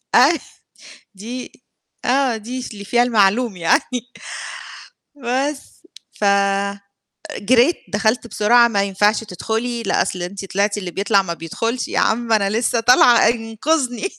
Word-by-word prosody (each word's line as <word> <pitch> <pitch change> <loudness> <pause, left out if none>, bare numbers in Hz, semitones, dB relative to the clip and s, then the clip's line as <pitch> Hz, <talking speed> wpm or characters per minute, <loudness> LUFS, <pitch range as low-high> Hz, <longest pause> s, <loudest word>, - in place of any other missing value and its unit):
أي 290 +6 +5 0.8
دي 240 +6 -8 0.5
آه 255 -2 +1
دي 245 +4 -6
س 245 - -7
اللي 200 -1 -9
فيها 240 +4 +2
المعلوم 220 -1 +2
يعني. 165 -1 +2 1.3
بس 270 +2 -4 0.3
ف 210 - 0 1.1
جريت 250 - +3 0.2
دخلت 220 +3 0
بسرعة، 235 +3 +4
ما 200 -3 0
ينفعش 205 +3 +1
تدخلي، 225 +4 -3
لآ 195 - +1
أصل 180 -2 -3
أنتِ 195 +2 -6
طلعتِ، 200 +2 -1
اللي 185 -3 -5
بيطلع 200 +1 +2
ما 170 -3 -4
بيدخُلش، 225 +9 -3
يا - - -1
عم 230 +1 0
أنا 200 -2 +2
لسّه 230 +2 0
طالعة 245 0 +5
انقِذني، 245 - -1
225 Hz, 130 wpm, -19 LUFS, 200-245 Hz, 1.3 s, أي